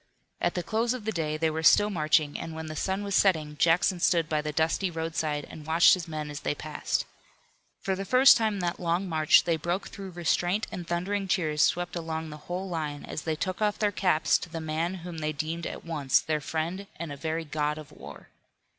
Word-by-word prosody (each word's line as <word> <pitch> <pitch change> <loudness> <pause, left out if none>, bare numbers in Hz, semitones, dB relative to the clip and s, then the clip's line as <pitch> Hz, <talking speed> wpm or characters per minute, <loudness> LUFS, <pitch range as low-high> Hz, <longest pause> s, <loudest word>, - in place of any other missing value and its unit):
At - - +1
the 180 - -1
close 230 +5 0
of 235 -5 -8
the 220 - 0
day 155 -5 -2
they 160 0 +1
were 160 +1 -3
still 205 +6 +5
marching, 155 -3 +2
and 160 - -6
when 160 0 -5
the 155 0 -6
sun 190 +4 -1
was 200 -1 -3
setting 160 -7 +2
Jackson 175 +3 +3
stood 170 -2 +2
by 155 -1 0
the 150 0 -3
dusty 160 +5 +1
roadside 160 -3 -2
and 155 -1 -11
watched 165 +2 +6
his 180 -3 -1
men 155 -2 -5
as 145 - -6
they - - -2
passed. 150 +1 -2 0.8
For 190 - -1
the 195 - -4
first 255 +6 +7
time 220 -2 +1
in - - -4
that 175 -1 -2
long 175 +2 0
march 155 -3 +5
they 170 -2 +1
broke 175 +5 -2
through 195 -1 -8
restraint 175 +3 0
and 175 -2 -6
thundering 195 +3 -1
cheers 155 -6 +1
swept 175 0 +1
along 160 -2 -4
the 150 - -8
whole 180 +2 -3
line 155 -5 -4
as - - -5
they 160 -1 -2
took 185 +5 -3
off 210 -1 +1
their 210 -1 +1
caps 180 -5 +2
to 180 - -8
the 165 0 -5
man 160 +3 -2
whom 170 -2 -6
they 155 0 -2
deemed 160 +3 -3
at - - -7
once 140 -5 +2
their 155 +1 -2
friend 165 +7 -3
and 165 -2 -6
a - - -5
very 160 +3 -3
god 150 0 -1
of 155 -2 -10
war. - - -12
165 Hz, 225 wpm, -28 LUFS, 155-185 Hz, 0.8 s, first